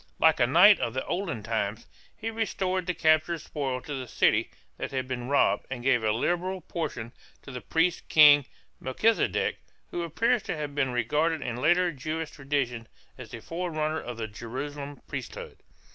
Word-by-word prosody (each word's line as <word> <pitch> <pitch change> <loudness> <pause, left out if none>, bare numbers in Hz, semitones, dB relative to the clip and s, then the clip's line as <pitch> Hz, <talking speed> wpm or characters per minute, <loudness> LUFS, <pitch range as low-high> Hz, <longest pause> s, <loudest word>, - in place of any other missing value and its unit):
Like 160 -3 +4
a 120 - +4
knight 180 - +7
of 120 +2 -2
olden 175 - -3
times, 110 0 -2 0.3
he 225 +1 -4
restored 190 -5 -1
the 180 - -1
captured 155 +2 +3
spoil 140 -4 -4
to 145 - -7
the 130 -2 -5
city - - +2 0.3
that - - -3
had 130 -1 -3
been 125 -1 -4
robbed 140 - +2
and 125 -2 -5
gave 125 -3 +3
a 110 - +2
liberal 175 - -1
portion, 120 -11 -5 0.3
to 135 - -10
the 125 -1 -6
priest 170 +2 0
king 145 -3 +7 0.3
Melchizedek, 215 - +1 0.3
who 175 - -3
appears 230 +9 +1
to 160 - -4
have 150 -1 -4
been 135 -3 0
regarded 150 +7 0
in 120 -1 -3
later 175 +6 +3
Jewish 155 +3 -4
tradition 135 -5 -2 0.3
as 130 -3 -10
the 120 -3 -8
forerunner 160 -1 -2
of 120 -1 -7
the 110 -1 -3
Jerusalem 140 +6 -7
priesthood. - - -7
145 Hz, 170 wpm, -27 LUFS, 125-170 Hz, 0.3 s, knight